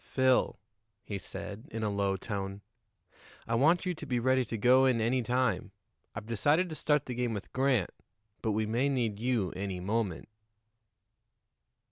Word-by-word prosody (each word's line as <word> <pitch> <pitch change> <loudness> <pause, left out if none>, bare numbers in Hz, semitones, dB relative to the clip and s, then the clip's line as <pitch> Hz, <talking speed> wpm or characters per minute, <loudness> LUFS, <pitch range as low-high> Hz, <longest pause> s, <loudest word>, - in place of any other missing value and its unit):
"Phil," 130 -1 +2 0.5
he 100 -2 -5
said 105 +3 -7
in 110 0 -4
a 105 - +1
low 100 -1 0
tone, 100 0 -4 0.9
"I 115 - -1
want 160 +10 +4
you 180 - 0
to 160 -2 -8
be 125 -2 0
ready 130 +2 +3
to 115 +1 -4
go 130 +4 +5
in 125 -3 +2
any 120 +3 +1
time. 115 -5 0 0.4
I've 105 0 -6
decided 145 - +2
to 155 - -5
start 150 -1 +1
the 125 - -4
game 120 -2 -1
with 100 - -7
Grant, 130 -7 +2 0.5
but 110 - 0
we 110 +1 0
may 120 +6 +1
need 115 -7 -1
you 115 -7 0
any 95 -1 -4
moment." 100 -1 -2
115 Hz, 165 wpm, -30 LUFS, 100-130 Hz, 0.9 s, go